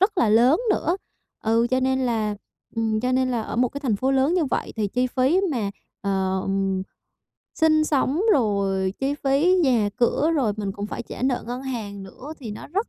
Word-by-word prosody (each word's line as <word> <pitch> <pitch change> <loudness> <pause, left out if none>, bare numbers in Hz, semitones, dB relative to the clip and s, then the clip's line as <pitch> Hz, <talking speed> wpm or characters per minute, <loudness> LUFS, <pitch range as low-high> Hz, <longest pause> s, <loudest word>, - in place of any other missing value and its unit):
rất 390 0 +2
là 235 - +4
lớn 245 - +5
nữa, 350 -3 +1 0.5
ừ, 230 +2 +3
cho 255 0 +2
nên 260 0 +1
là 220 -4 0 0.4
ừm, 220 -1 0
cho 250 +2 0
nên 255 0 +2
là 235 -3 -1
ở 215 - -5
một 250 0 +3
cái 280 - -7
thành 240 -8 0
phố 260 +6 0
lớn 270 +5 +2
như 355 -3 +2
vậy 270 - -2
thì 210 -2 0
chi 250 +5 0
phí 260 +8 +2
mà, 225 -8 -1 0.3
ờ, 190 -1 0 1.1
sinh 310 -1 +3
sống, 285 +1 +1
rồi 195 - +1
chi 275 +1 0
phí 290 +7 +4
nhà 240 -7 +3
cửa, 275 +5 +2
rồi 240 -7 +1
mình 200 -2 -3
cũng 205 +1 -5
phải - - -5
trả 240 - -8
nợ 255 -1 0
ngân 245 +2 -4
hàng 215 -7 -5
nữa 255 +10 -9
thì 240 -7 -7
nó 210 - -8
rất 400 +8 -2
250 Hz, 205 wpm, -24 LUFS, 215-275 Hz, 1.1 s, lớn